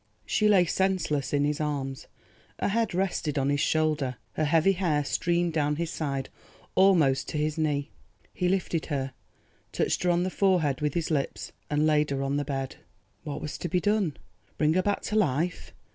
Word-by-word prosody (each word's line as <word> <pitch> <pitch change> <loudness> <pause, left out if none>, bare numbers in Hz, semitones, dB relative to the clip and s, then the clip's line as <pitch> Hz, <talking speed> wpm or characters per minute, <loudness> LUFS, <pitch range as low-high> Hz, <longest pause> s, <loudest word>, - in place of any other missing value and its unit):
She 215 - +2
lay 190 -4 +5
senseless 175 -6 0
in 145 0 +2
his 150 +1 -1
arms, 135 -3 -3 0.5
her - - 0
head 225 -2 0
rested 175 -5 -1
on 135 +1 +1
his 145 - +1
shoulder, 150 -4 +1 0.2
her 155 - 0
heavy 165 +5 +4
hair 170 -6 +1
streamed 175 +2 0
down 150 -1 +1
his 170 +1 -3
side 140 -4 -3 0.4
almost 170 -9 +4
to - - -3
his 150 0 0
knee. 150 -2 -1 0.4
He 180 -1 0
lifted 180 -3 -1
her, 135 -3 -2 0.6
touched - - 0
her 180 - +1
on 175 0 +2
the 185 - -2
forehead 180 -10 +2
with 150 -1 -1
his 170 -1 -1
lips 140 -3 -2 0.2
and 150 +1 +2
laid 150 -1 +3
her 135 -1 -1
on 135 +1 0
the 145 - 0
bed. 135 -2 -4 0.5
What 150 -3 -5
was 150 -2 -5
to 175 - -3
be 180 - +2
done? 205 -6 +1 0.4
Bring 155 0 +3
her 185 - +3
back 205 +2 0
to 210 - -3
life? 175 -3 0
155 Hz, 190 wpm, -27 LUFS, 145-180 Hz, 0.6 s, lay